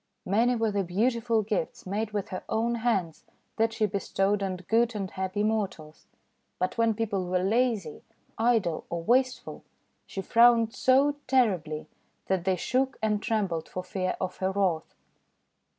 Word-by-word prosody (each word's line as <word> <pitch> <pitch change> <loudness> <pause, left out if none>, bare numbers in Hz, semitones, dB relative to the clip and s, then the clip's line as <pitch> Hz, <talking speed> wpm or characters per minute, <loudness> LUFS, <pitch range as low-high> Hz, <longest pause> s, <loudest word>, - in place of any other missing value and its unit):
Many 230 +6 +2
were 225 -2 0
the 200 -1 0
beautiful 225 +4 +1
gifts, 205 -6 -3
made 205 +3 -2
with 210 0 -3
her 185 - -5
own 230 +2 +1
hands, 190 -9 0 0.3
that 225 0 +2
she 225 -1 0
bestowed 200 0 0
on 190 -1 -1
good 225 +6 +1
and 195 -3 -3
happy 190 +2 -2
mortals. 195 -8 -3 0.5
But 185 - -1
when 230 -2 +2
people 205 -4 -2
were 180 0 0
lazy, 215 -6 0 0.3
idle, 225 -8 +1
or 170 -1 -3
wasteful, 255 +5 0 0.4
she 195 - -5
frowned 230 0 +5
so 275 +3 +3
terribly 185 - +1 0.4
that 190 -2 -1
they 190 -1 +2
shook 260 +8 0
and 210 -1 +1
trembled 195 -9 -1
for 185 - -5
fear 185 0 -2
of 185 -1 -3
her 190 0 0
wrath. 190 -5 -1
205 Hz, 150 wpm, -28 LUFS, 185-230 Hz, 0.5 s, frowned